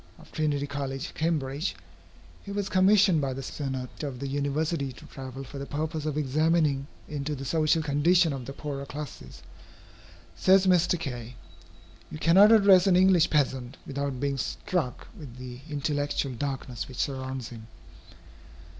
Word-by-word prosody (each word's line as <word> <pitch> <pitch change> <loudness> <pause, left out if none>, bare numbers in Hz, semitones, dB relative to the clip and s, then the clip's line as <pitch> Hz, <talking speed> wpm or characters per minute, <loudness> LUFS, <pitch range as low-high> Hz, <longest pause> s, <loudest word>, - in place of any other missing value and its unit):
of - - -17
Trinity 145 -2 0
College, 140 0 -4
Cambridge, 155 -1 -1 0.7
who 200 0 -6
was 200 -1 -2
commissioned 190 -3 +5
by 135 -2 -1
the 135 +1 -6
Senate 130 -2 -5
of 140 -4 -4
the 140 - -4
University 145 +1 -1
to 125 - -13
travel 135 0 -8
for 140 +1 -8
the 140 - -4
purpose 155 +1 -3
of 150 -1 -2
examining 150 -1 +1 0.2
into 150 0 -3
the 135 0 -7
social 155 +2 +2
condition 160 +3 +3
of 130 -3 -6
the - - -5
poorer 140 -1 -5
classes. 140 - -8 0.9
Says 190 - +4
Mr. 180 -1 +3
Kay: 125 -6 -6 0.7
"You - - -7
cannot 190 +7 +6
address 195 -4 +7
an 185 - +5
English 180 -2 +5
peasant, 135 -3 0
without 140 -2 -3
being 140 0 -1
struck 155 - -3
with 140 - -10
the 125 -1 -8
intellectual 145 -2 -1
darkness 135 -1 -4
which 130 - -10
surrounds 130 -3 -3
him. 115 -2 -11
145 Hz, 150 wpm, -27 LUFS, 135-165 Hz, 0.9 s, address